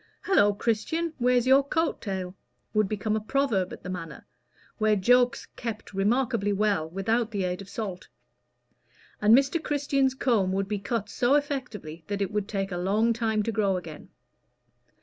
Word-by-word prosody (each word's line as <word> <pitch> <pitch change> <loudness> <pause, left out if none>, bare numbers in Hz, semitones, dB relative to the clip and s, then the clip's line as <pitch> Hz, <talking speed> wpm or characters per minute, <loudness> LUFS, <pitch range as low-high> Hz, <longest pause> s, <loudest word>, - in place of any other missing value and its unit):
"Hallo, 205 - +4
Christian! 235 +11 -1
where's 250 0 +3
your 265 +2 +6
coat 325 +4 -1
tail?" 190 -3 -4 0.4
would 215 -3 +2
become 215 0 -1
a - - +1
proverb 220 -6 0
at - - -10
the 185 - -6
Manor, 165 -5 -7 0.5
where 215 -1 +3
jokes 245 +5 +3
kept 230 -4 -6
remarkably 220 +1 +1
well 200 -5 +1
without 220 +6 0
the 200 -4 -2
aid 180 +1 -2
of 195 - -11
salt; 200 -3 -5 1.1
and 215 +3 +7
Mr. 275 +4 +1
Christian's 275 -2 +1
comb 215 -8 +1
would 195 0 -1
be 210 0 -2
cut 205 +1 -2
so 245 +6 +2
effectually 250 - -3
that 205 -1 -3
it 195 -2 -1
would 210 -1 -2
take 195 -2 -3
a 175 - -3
long 210 +6 +2
time 220 -2 0
to 230 - -1
grow 200 -4 +1
again. 160 -4 -9
215 Hz, 170 wpm, -27 LUFS, 195-245 Hz, 1.1 s, and